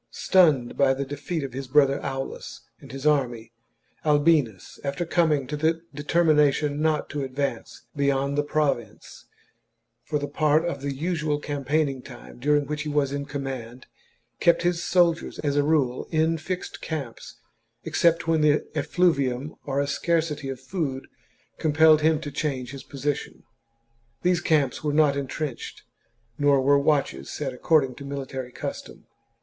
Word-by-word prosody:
Stunned 155 -10 +3
by 135 -1 +3
the 140 +1 -3
defeat 145 +3 -4
of 135 -3 -6
his 135 0 -5
brother 140 0 +3
Aulus 135 0 -5 0.2
and - - -13
his 135 +1 -7
army, 120 -6 +1 0.5
Albinus, 145 - +2
after 140 +5 -2
coming 160 -5 +2
to 145 +4 -4
the 160 +2 0
determination 150 -1 +2
not 155 -1 +1
to 145 -1 -3
ad 130 -1 -7
vance 140 0 -3
beyond 140 0 +1
the 145 - +2
province, 145 -7 -2 0.8
for 150 - -1
the 145 0 -3
part 155 +2 +2
of 170 -5 -3
the 140 0 -2
usual 155 +1 -1
campaigning 145 -1 -1
time 125 -2 -12
during 145 +2 +2
which 150 +1 -3
he 150 - -4
was 145 -2 +1
in 140 0 -3
command, 130 -4 -6 0.5
kept 170 0 +3
his 175 -1 +1
soldiers, 170 -2 +2
as 145 -1 0
a 145 - +4
rule, 140 -4 +1
in 160 0 +2
fixed 180 +3 -5
camps, 140 -8 -6 0.5
except 170 0 +2
when 160 -1 +2
the 150 0 +3
effluvium 150 -4 +1
or 140 0 0
a 140 - +1
scarcity 150 0 -1
of 135 -2 -5
food 135 -2 -3 0.5
compelled 155 0 +5
him 155 0 +3
to 150 -2 -6
change 130 -5 -3
his 135 -1 -8
position. 140 +1 -4 0.8
These 180 -1 +2
camps 150 -5 +1
were 150 -1 0
not 150 -2 +4
entrenched, 140 -1 -5 0.6
nor 145 -1 +4
were 140 +2 +4
watches 140 - 0
set 135 -3 -4
according 135 0 +2
to - - -8
mili 140 -1 -5
tary 130 -2 -6
custom. - - -7
145 Hz, 155 wpm, -25 LUFS, 135-155 Hz, 0.8 s, compelled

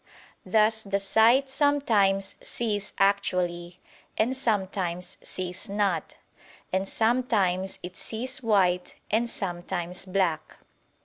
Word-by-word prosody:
Thus 220 0 +3
the 200 -2 -1
sight 225 +7 +4
sometimes 225 -9 +2
sees 210 -4 -2
actually, 180 -3 0 0.4
and 245 +4 +1
sometimes 190 -7 -2
sees 185 +3 -4
not: 200 -5 -1 0.6
and 190 +1 0
sometimes 215 -6 +1
it 180 +1 -7
sees 255 +5 -4
white, 185 -6 +2 0.2
and 230 +3 +2
sometimes 180 -2 -4
black. 180 -4 -1
195 Hz, 100 wpm, -27 LUFS, 180-225 Hz, 0.6 s, sight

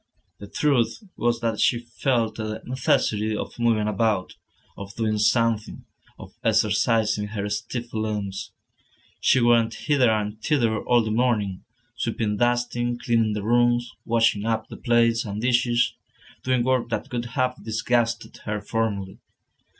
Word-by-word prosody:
The 100 - -9
truth 140 - 0
was 120 0 0
that 115 -2 -1
she 120 - +3
felt 120 -1 -1
the 110 -1 -4
necessity 110 -4 0
of - - -6
moving 115 -3 +2
about, 105 -2 0 0.4
of 100 +1 -9
doing 110 -2 0
something, 110 0 +1 0.3
of - - -12
exercising 105 0 +2
her 105 -1 -4
stiff 115 +3 -4
limbs. 105 -3 -3 0.7
She 130 - +4
went 115 -1 +3
hither 135 -1 +2
and 105 0 -1
thither 115 -7 +1
all 120 -1 +4
the 110 - -3
morning, 110 -5 0 0.3
sweeping, 110 -2 -2
dusting, 120 0 0
cleaning 115 -3 +1
the 105 -1 -3
rooms, 120 +1 +2
washing 115 -3 +2
up 110 0 -1
the - - -9
plates 115 -2 +2
and 105 -1 -5
dishes, 120 0 +2 0.5
doing 130 -2 +1
work 130 -2 +1
that 115 - -3
would 120 -1 -2
have 130 -2 0
disgusted 115 +1 -1
her 105 0 -2
formerly. 100 -4 -3
115 Hz, 140 wpm, -24 LUFS, 105-120 Hz, 0.7 s, She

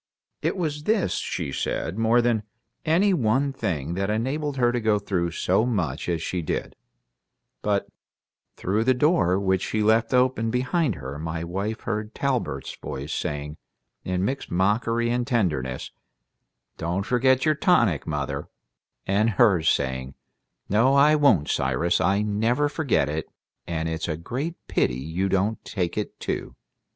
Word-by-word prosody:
It - - -1
was 150 -4 -2
this, 215 -3 +2
she 70 - -3
said, 80 +5 -2
more 115 +2 +4
than 120 -3 +2 0.4
any 185 +6 +3
one 135 0 +1
thing 80 - -2
that 95 +2 -1
enabled 135 +6 -1
her 120 -1 +3
to 120 -1 -1
go 110 -1 +3
through 95 -4 -1
so 90 +5 +1
much 90 - -1
as 85 -2 -1
she 90 - -2
did; 80 - -3 0.9
but 100 -1 0 0.7
through 105 +4 0
the 130 +2 +3
door 125 - +3
which 95 -1 +1
she 110 0 -1
left 110 +1 +3
open 125 -3 +2
behind 130 - 0
her 70 0 -7
my 80 +1 -3
wife 100 +6 -3
heard 110 0 -3
Talbert's 120 - -2
voice 70 +3 -5
saying, 75 +1 -3 0.5
in 90 +1 -1
mixed 135 +4 -3
mockery 115 +6 +1
and 120 0 0
tenderness, 75 - -1 0.9
"Don't 90 +4 -2
forget 130 +3 +3
your 155 - +4
tonic, 120 - +2
mother," 75 -3 -3 0.6
and 105 +4 +2
hers 100 -8 +4
saying, 65 +1 -1 0.5
"No, 115 +7 +3
I 145 +2 +6
won't, 110 - +4
Cyrus. 65 +7 +1
I 100 +2 +2
never 115 +7 +1
forget 145 - +1
it, 75 +1 -3 0.4
and 80 -1 -2
it's 80 0 -3
a 80 -2 -2
great 135 - -4
pity - - +1
you 80 +8 -2
don't 100 +4 0
take 90 -5 -2
it, 105 - -4
too." - - -4
105 Hz, 150 wpm, -25 LUFS, 85-125 Hz, 0.9 s, I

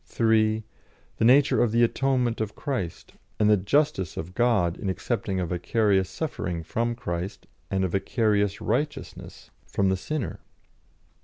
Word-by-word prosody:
(3) 110 +2 +2 0.5
The - - +2
nature 140 +4 +5
of 120 - +2
the 115 +1 +3
atonement 125 -1 +1
of 110 -1 -3
Christ, 100 - -4 0.3
and 105 0 +4
the - - +7
"justice" 100 - 0
of 85 +3 -5
God 105 -7 +2
in 100 - -4
accepting 95 0 -2
a 90 - 0
vicarious 95 +2 +1
suffering 90 - -4
from 115 +8 -1
Christ, 90 -4 -5 0.2
and 95 -1 0
a - - +1
vicarious 105 +1 +1
righteousness 145 +7 -4 0.2
from 100 -1 +1
the 95 - +1
sinner. 150 +7 -4
105 Hz, 145 wpm, -26 LUFS, 95-120 Hz, 0.5 s, the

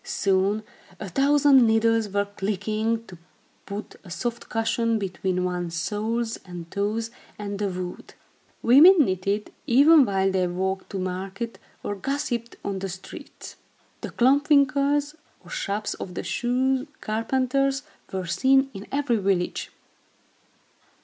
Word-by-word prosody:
Soon, 205 - +1 0.4
a 200 - -5
thousand 275 +3 +5
needles 225 -1 +2
were 200 +1 0
clicking, 215 +3 -2
to 180 -6 -13 0.5
put 205 +2 -7
a 190 - -13
soft 235 +7 -4
cushion 225 0 0
between 185 -2 -2
one's 175 -2 -3
soles 220 +6 -2
and 175 -2 -9
toes 215 +3 -2 0.3
and 205 -1 -5
the 205 - 0
wood. 180 -1 -7 0.5
Women 305 +6 +8
knitted, 195 +2 -2 0.2
even 285 +5 +7
while 195 -2 +1
they 185 -1 +1
walked 190 +2 -3
to 195 - -5
market, 190 +5 -4 0.2
or - - -2
gossiped 235 +1 -3
on 195 -1 -2
the 195 0 -4
streets. 185 +1 -10 0.4
The - - -5
klomp 275 +4 +3
winkels, 285 0 +3 0.3
or - - -13
shops 210 - -2
of 180 - -8
the - - -3
shoe 260 +3 0
carpenters, 265 +5 0 0.3
were 190 -1 -3
seen 270 +9 +3
in 200 0 -9
every 275 -4 +1
village. 190 -3 -1
215 Hz, 130 wpm, -25 LUFS, 190-260 Hz, 0.5 s, Women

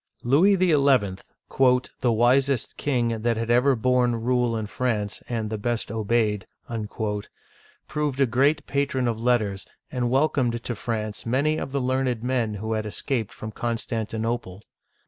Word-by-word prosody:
Louis 160 +11 +5
XL, 160 -7 +3 1.1
"the 125 - +2
wisest 125 +3 +2
king 120 -5 0
that 115 0 +1
had 115 +1 -1
ever 125 +3 +4
borne 125 0 +2
rule 120 0 +1
in 110 - -3
France, 105 -2 -2
and 110 -3 -2
the 110 - -3
best 115 0 -2
obeyed," 110 -1 0 1.4
proved 150 -3 -2
a 135 - +5
great 135 +5 +2
patron 135 -3 0
of 115 -1 -2
let 125 +1 +4
ters, 100 -3 -5 0.2
and 125 -2 -1
welcomed 130 -3 +1
to 120 - -3
France 110 -1 -4
many 145 +6 +1
of - - -5
the 140 - 0
learned 130 -2 0
men 120 -4 0
who 110 +2 -3
had 110 -1 -2
escaped 115 +1 -2
from 110 - -7
Constantinople. 115 -3 -3
120 Hz, 145 wpm, -25 LUFS, 110-130 Hz, 1.4 s, Louis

